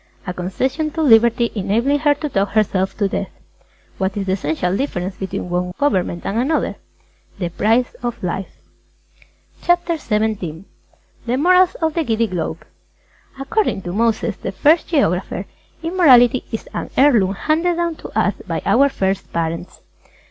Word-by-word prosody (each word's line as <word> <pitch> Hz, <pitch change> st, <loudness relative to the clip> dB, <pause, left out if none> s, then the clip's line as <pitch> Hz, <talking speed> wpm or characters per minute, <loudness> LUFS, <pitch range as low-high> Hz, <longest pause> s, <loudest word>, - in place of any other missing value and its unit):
_ -, -, -19 dB
A. -, -, -1 dB
A -, -, -7 dB
concession 260 Hz, -, -2 dB
to 320 Hz, +1 st, -2 dB
Liberty 235 Hz, -2 st, +4 dB
enabling 230 Hz, +8 st, +1 dB
her 290 Hz, -1 st, +3 dB
to 300 Hz, +1 st, -4 dB
talk 200 Hz, -7 st, 0 dB
herself 190 Hz, -3 st, +1 dB
to 205 Hz, -, +1 dB
death. -, -, -3 dB
Q. -, -, -31 dB, 0.6 s
What 190 Hz, +1 st, -1 dB
is 200 Hz, -, -2 dB
the 190 Hz, -, -1 dB
essential 180 Hz, 0 st, -1 dB
difference 190 Hz, -7 st, -3 dB
between 190 Hz, -1 st, -5 dB
one 180 Hz, 0 st, -2 dB
government 185 Hz, -10 st, 0 dB
and 210 Hz, +4 st, -1 dB
another? 290 Hz, +6 st, 0 dB, 0.6 s
A. -, -, -26 dB
The 175 Hz, -3 st, -2 dB
price 225 Hz, +8 st, +1 dB
of 240 Hz, -3 st, -4 dB
life. 185 Hz, +1 st, -3 dB, 1.1 s
CHAPTER 350 Hz, -1 st, +1 dB
XVII 210 Hz, -, -2 dB, 0.6 s
THE 245 Hz, +2 st, +1 dB
MORALS 365 Hz, +4 st, +4 dB
OF 320 Hz, -1 st, +1 dB
THE 330 Hz, -, 0 dB
GIDDY 230 Hz, -4 st, +1 dB
GLOBE 170 Hz, -5 st, -4 dB, 0.7 s
According 275 Hz, -, -1 dB
to 175 Hz, -, -5 dB
Moses, 225 Hz, 0 st, 0 dB
the -, -, -5 dB
First 300 Hz, -, +3 dB
Geographer, 190 Hz, -, 0 dB, 0.4 s
Immorality 265 Hz, -9 st, +5 dB
is 225 Hz, -, -5 dB
an -, -, -4 dB
heirloom 225 Hz, -9 st, +4 dB
handed 330 Hz, -, +1 dB
down 340 Hz, -1 st, -1 dB
to -, -, -9 dB
us -, -, +2 dB
by -, -, -3 dB
our 280 Hz, +1 st, +4 dB
First 195 Hz, -6 st, -2 dB
Parents. 165 Hz, +1 st, -4 dB
220 Hz, 165 wpm, -19 LUFS, 190-290 Hz, 1.1 s, Immorality